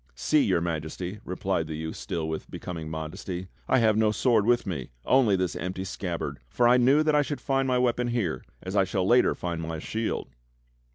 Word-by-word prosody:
"See, 150 - +3
your 90 -8 +2
Majesty," 85 +4 -4
replied 90 -2 -2
the 80 - -4
youth 80 0 -5
still 80 -2 -3
with 80 0 -4
becoming 80 -3 -6
modesty, 80 +4 -5 0.2
"I 130 - +4
have 110 -3 +4
no 110 0 +3
sword 110 0 +2
with 120 0 +3
me, 80 - -4 0.2
only 125 -6 +4
this 90 -2 -1
empty 95 +1 -4
scabbard; 85 -7 -4
for 120 - +3
I 125 +1 +6
knew 135 +5 +5
that 155 -1 +2
I 150 - +5
should 145 0 -3
find 135 -1 0
my 130 -1 +2
weapon 125 -1 +1
here, 100 - -1 0.2
as 95 +2 -5
I 100 - +5
shall 95 0 -1
later 120 +5 +4
find 85 -2 -3
my 80 0 -4
shield." 110 - -3
95 Hz, 205 wpm, -27 LUFS, 85-120 Hz, 0.2 s, I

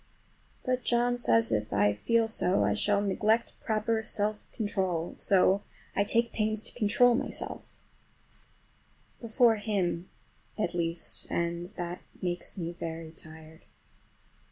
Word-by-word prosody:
But 255 -1 0
John 245 0 +2
says 115 - +2
if 105 0 -1
I 105 +1 +3
feel 230 - +1
so 195 -4 +2
I - - +2
shall 205 -1 +2
neglect 215 +3 +1
proper 220 +1 0
self 210 -1 -1
control; 190 -6 -2
so 195 0 +3 0.3
I 200 - +3
take 230 +3 +1
pains 215 0 0
to - - -3
control 245 +2 +4
myself,—before 230 -1 -4
him, 190 -4 -1 0.5
at 185 -5 -1
least,—and 170 0 -1
that 175 0 -4 0.2
makes 175 +1 -2
me 170 -2 -3
very 165 -1 -6
tired. 160 0 -12
200 Hz, 115 wpm, -29 LUFS, 170-220 Hz, 0.5 s, control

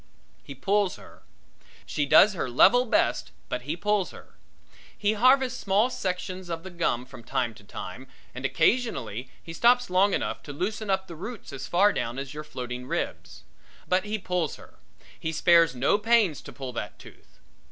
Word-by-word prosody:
He 140 - -10
pulls 195 +7 +1
her. - - -15 0.6
She 145 -1 -1
does 205 +8 +7
her 165 - -3
level 245 - +5
best 125 - +1 0.2
but 125 - -2
he 150 +6 -4
pulls 205 0 0
her. - - -14 0.6
He 210 +1 +1
harvests 255 +3 +3
small 210 +6 +2
sections 185 -2 -4
of 165 -1 -4
the 190 - -8
gum 145 -8 -1
from 120 - -13
time 120 -1 -1
to 105 - -16
time 105 +5 -8 0.3
and 125 - -7
occasionally 135 - 0
he 165 - -8
stops 245 +3 +3
long 190 +2 +4
enough - - -3
to 145 - -8
loosen 205 +7 -3
up 190 0 +1
the 170 - -10
roots 200 - -8
as 135 -1 -6
far 200 +4 +4
down 120 +2 -3
as 135 0 -5
your 150 +1 -6
floating 125 -3 -6
ribs. - - -4 0.4
But 185 +2 +1
he 215 +1 -2
pulls 180 -5 -2
her. - - -17 0.4
He 160 - -3
spares 165 -2 +4
no 140 +11 +2
pains 215 - +3
to - - -11
pull 130 -2 -7
that 105 - -5
tooth. - - -17
175 Hz, 180 wpm, -26 LUFS, 135-205 Hz, 0.6 s, does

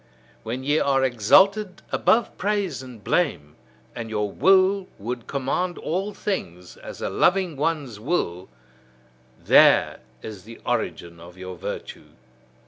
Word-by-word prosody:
When 120 +4 -5
ye 145 +3 +2
are 135 -1 +2
exalted 190 - +3
above 230 0 +2
praise 200 -7 -1
and 125 -5 -12
blame, 100 - -1 0.4
and 115 -1 -6
your 105 -2 -2
will 190 - +3
would 120 +3 -6
command 140 +7 -2
all 190 +6 -2
things, 90 - -5
as - - -10
a - - -1
loving 180 -3 +2
one's 145 -6 -2
will: 100 - -2 0.9
there - - +5 0.2
is 105 -4 -8
the 115 +3 -12
origin 85 -1 -3
of 85 +2 -13
your 95 0 -7
virtue. - - -8
135 Hz, 130 wpm, -24 LUFS, -, 0.9 s, there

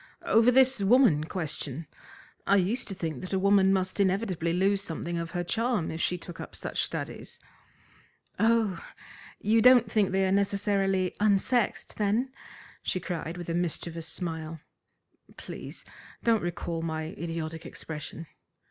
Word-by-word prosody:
"Over 235 -8 +5
this 260 0 +5
woman 195 - +5
question. 155 -3 -4 0.6
I 200 - +5
used 200 +6 +1
to 195 - -5
think 160 -7 -4
that 185 - -6
a - - +3
woman 195 0 +5
must 185 0 0
inevitably 190 -4 +1
lose 195 +3 +2
something 170 -1 -3
of 170 0 -4
her 175 - 0
charm 225 0 0
if 160 - -4
she 180 - +1
took 175 0 -10
up - - -8
such - - -2
studies." - - -5 1.0
"Oh, 220 -6 +2 0.6
you 225 +2 +3
don't 245 -2 +6
think 210 -3 +3
they 190 0 +2
are 190 - +1
necessarily 195 -1 +1
unsexed, 210 +3 +1
then?" 220 +5 +1 0.5
she 185 - -1
cried, 170 -1 -4
with 175 - -7
a - - 0
mischievous 170 -1 -3
smile. 160 -2 -4 0.8
"Please - - -8 0.4
don't 225 -2 +3
recall 170 -1 -3
my 160 -1 -3
idiotic 165 -1 -5
expression." 160 +1 -7
185 Hz, 145 wpm, -28 LUFS, 165-210 Hz, 1.0 s, don't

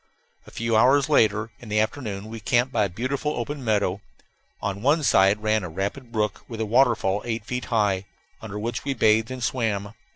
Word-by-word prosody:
A - - -12
few 115 0 -1
hours 135 +5 +4
later, 110 -5 +3
in 115 - -11
the 105 +1 +1
afternoon, 110 -3 -2
we 110 +1 -7
camped 120 +5 +1
by 105 - +3
a - - -3
beautiful 135 - -2
open 145 -2 -4
meadow; 105 -3 0 0.6
on 100 0 -3
one 150 +6 +3
side 100 -3 +4
ran 110 -1 +1
a 90 - -5
rapid 100 - -4
brook, 105 -3 -1
with 115 -2 -7
a 110 - 0
waterfall 110 -4 +2
eight 115 -2 -3
feet 125 +1 -3
high, 100 -4 0 0.3
under 105 - -6
which 115 +3 -3
we 140 -1 -2
bathed 110 0 +3
and 130 -1 -5
swam. 105 -5 -1
110 Hz, 195 wpm, -24 LUFS, 105-125 Hz, 0.6 s, hours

